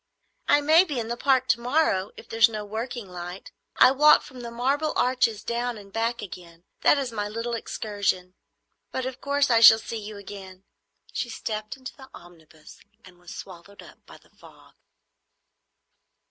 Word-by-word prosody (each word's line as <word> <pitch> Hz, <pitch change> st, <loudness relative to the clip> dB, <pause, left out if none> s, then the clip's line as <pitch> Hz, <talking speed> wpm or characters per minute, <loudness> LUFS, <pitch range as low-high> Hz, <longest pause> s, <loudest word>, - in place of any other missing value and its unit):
"I 290 Hz, -, +4 dB
may 315 Hz, +4 st, +6 dB
be 295 Hz, -9 st, -4 dB
in 225 Hz, -1 st, -4 dB
the 235 Hz, -, -2 dB
Park 260 Hz, 0 st, +2 dB
to 235 Hz, -, +3 dB
morrow, 235 Hz, -7 st, +1 dB
if -, -, -12 dB
there 225 Hz, -, -7 dB
is 225 Hz, 0 st, +7 dB
no 215 Hz, -2 st, -5 dB
working 225 Hz, +1 st, -5 dB
light. 180 Hz, +1 st, -8 dB, 0.2 s
I -, -, +7 dB
walk 300 Hz, +3 st, +6 dB
from 255 Hz, -, -12 dB
the 240 Hz, -1 st, -6 dB
Marble 275 Hz, +6 st, -1 dB
Arch 250 Hz, -1 st, +2 dB, 0.2 s
down 235 Hz, 0 st, -2 dB
and 200 Hz, -1 st, -14 dB
back 230 Hz, +1 st, -1 dB
again; 170 Hz, -3 st, -11 dB, 0.2 s
that -, -, +4 dB
is 270 Hz, -4 st, -2 dB
my 205 Hz, -2 st, -3 dB
little 230 Hz, +2 st, -4 dB
excursion. 200 Hz, -5 st, -2 dB, 0.6 s
But 260 Hz, -, -3 dB
of 260 Hz, 0 st, -6 dB
course 280 Hz, -1 st, +1 dB
I 230 Hz, -, +5 dB
shall 225 Hz, -1 st, +10 dB
see 225 Hz, 0 st, -6 dB
you 210 Hz, 0 st, -8 dB
again." 195 Hz, -2 st, -10 dB, 0.5 s
She 240 Hz, -, -3 dB
stepped 215 Hz, 0 st, -5 dB
into 260 Hz, -1 st, -9 dB
the 265 Hz, -1 st, -14 dB
omnibus 160 Hz, -3 st, -16 dB, 0.3 s
and 180 Hz, -1 st, -17 dB
was 175 Hz, 0 st, -11 dB
swallowed 190 Hz, +2 st, -11 dB
up -, -, -17 dB
by -, -, -13 dB
the -, -, -26 dB
fog. -, -, -19 dB
225 Hz, 180 wpm, -25 LUFS, 195-255 Hz, 0.6 s, shall